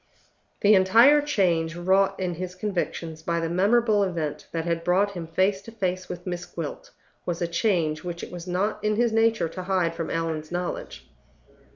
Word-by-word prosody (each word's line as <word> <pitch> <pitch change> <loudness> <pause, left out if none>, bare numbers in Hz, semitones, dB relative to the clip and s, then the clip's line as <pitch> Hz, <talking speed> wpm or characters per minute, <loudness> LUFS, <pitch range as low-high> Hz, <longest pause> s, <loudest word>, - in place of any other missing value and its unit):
The 210 +1 +6
entire 230 +10 +6
change 175 - +1
wrought 190 +3 +2
in 180 -2 -1
his 180 +2 -6
convictions 175 -5 -3
by 170 +1 -1
the 165 0 -2
memorable 210 +4 +3
event 170 -6 -2
that 165 -1 -3
had 170 -1 -1
brought 190 +4 +2
him 175 -4 -6
face 190 +4 +1
to 230 - -11
face 185 -4 -3
with 180 0 -7
Miss 175 -1 -4
Gwilt 165 -4 -6 0.3
was 175 -1 -3
a 170 - 0
change 170 -4 0
which 175 -1 -5
it - - -7
was 175 0 -8
not 200 +4 -1
in 215 0 +1
his 235 +1 +2
nature 225 -5 +3
to 185 - -6
hide 180 -3 0
from 165 -1 -4
Allan's 160 -1 -3
knowledge. 180 - -4
180 Hz, 185 wpm, -25 LUFS, 170-200 Hz, 0.3 s, The